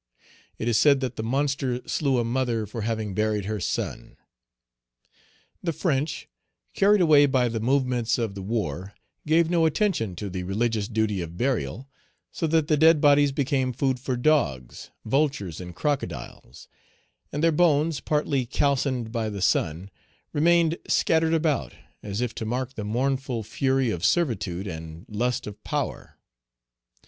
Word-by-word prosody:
It 115 Hz, -, -4 dB
is 115 Hz, -2 st, +3 dB
said 140 Hz, -2 st, +5 dB
that 130 Hz, -2 st, -3 dB
the -, -, -4 dB
monster 135 Hz, +1 st, -1 dB
slew 140 Hz, -4 st, +1 dB
a 120 Hz, -, +2 dB
mother 120 Hz, -2 st, -1 dB
for 110 Hz, +3 st, -6 dB
having 110 Hz, -2 st, -2 dB
buried 105 Hz, 0 st, 0 dB
her 105 Hz, +1 st, -3 dB
son. -, -, -4 dB, 1.4 s
The 170 Hz, -, -1 dB
French, 150 Hz, -2 st, -1 dB, 0.5 s
carried 200 Hz, 0 st, +4 dB
away 150 Hz, -4 st, +6 dB
by 130 Hz, -3 st, +2 dB
the 115 Hz, -1 st, -3 dB
movements 125 Hz, -1 st, +1 dB
of 115 Hz, -4 st, -2 dB
the 100 Hz, -, -7 dB
war, 95 Hz, -3 st, -3 dB, 0.3 s
gave 160 Hz, +1 st, +4 dB
no 165 Hz, -2 st, +4 dB
attention 160 Hz, -, 0 dB
to 100 Hz, -, -5 dB
the 95 Hz, -1 st, -4 dB
religious 105 Hz, +3 st, -1 dB
duty 110 Hz, -4 st, 0 dB
of 85 Hz, 0 st, -7 dB
burial, 125 Hz, -, -1 dB, 0.4 s
so 165 Hz, -, -2 dB
that 160 Hz, -1 st, +2 dB
the 155 Hz, -2 st, +3 dB
dead 160 Hz, +1 st, +6 dB
bodies 145 Hz, -1 st, +5 dB
became 135 Hz, -2 st, 0 dB
food 130 Hz, 0 st, 0 dB
for 125 Hz, 0 st, -2 dB
dogs, 120 Hz, -, 0 dB, 0.2 s
vultures, 110 Hz, -, 0 dB
and 90 Hz, -1 st, -9 dB
crocodiles; 130 Hz, -, -4 dB, 0.6 s
and 145 Hz, +2 st, -3 dB
their 165 Hz, -, +5 dB
bones, 155 Hz, -1 st, +2 dB
partly 145 Hz, -4 st, 0 dB
calcined 130 Hz, -4 st, 0 dB
by 115 Hz, -2 st, -2 dB
the 100 Hz, -1 st, -5 dB
sun, 90 Hz, 0 st, 0 dB, 0.4 s
remained 170 Hz, +1 st, +3 dB
scattered 160 Hz, 0 st, +2 dB
about, 155 Hz, -3 st, 0 dB, 0.3 s
as 100 Hz, +2 st, -4 dB
if 125 Hz, -2 st, -2 dB
to -, -, -5 dB
mark 125 Hz, +3 st, -3 dB
the 110 Hz, -, -5 dB
mournful 130 Hz, +2 st, -1 dB
fury 130 Hz, +3 st, 0 dB
of 85 Hz, -4 st, -4 dB
servitude 105 Hz, -, 0 dB
and 80 Hz, 0 st, -8 dB
lust 120 Hz, +4 st, -1 dB
of 105 Hz, -1 st, -9 dB
power. -, -, -4 dB
125 Hz, 155 wpm, -25 LUFS, 105-145 Hz, 1.4 s, away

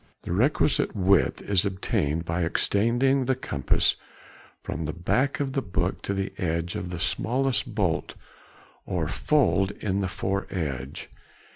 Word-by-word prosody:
The -, -, -5 dB
requisite 130 Hz, -, +2 dB
width 95 Hz, -1 st, +3 dB
is 100 Hz, -3 st, +2 dB
obtained 85 Hz, -5 st, -1 dB
by 85 Hz, +2 st, -1 dB
extending 120 Hz, +10 st, +2 dB
the 130 Hz, +1 st, +2 dB
compass 70 Hz, -, +1 dB, 0.7 s
from 80 Hz, 0 st, -4 dB
the 75 Hz, -, -3 dB
back 135 Hz, -, 0 dB
of 135 Hz, -2 st, -1 dB
the 135 Hz, -, +1 dB
book 90 Hz, -7 st, -1 dB
to 100 Hz, -, -2 dB
the 95 Hz, 0 st, -2 dB
edge 85 Hz, 0 st, -1 dB
of 90 Hz, -, -4 dB
the 90 Hz, -1 st, -5 dB
smallest 125 Hz, +8 st, 0 dB
bolt -, -, 0 dB, 0.7 s
or 85 Hz, -4 st, -1 dB
fold 95 Hz, -, +2 dB
in 100 Hz, -1 st, -1 dB
the 95 Hz, -, 0 dB
foredge. 80 Hz, -9 st, -3 dB
95 Hz, 140 wpm, -26 LUFS, 85-125 Hz, 0.7 s, width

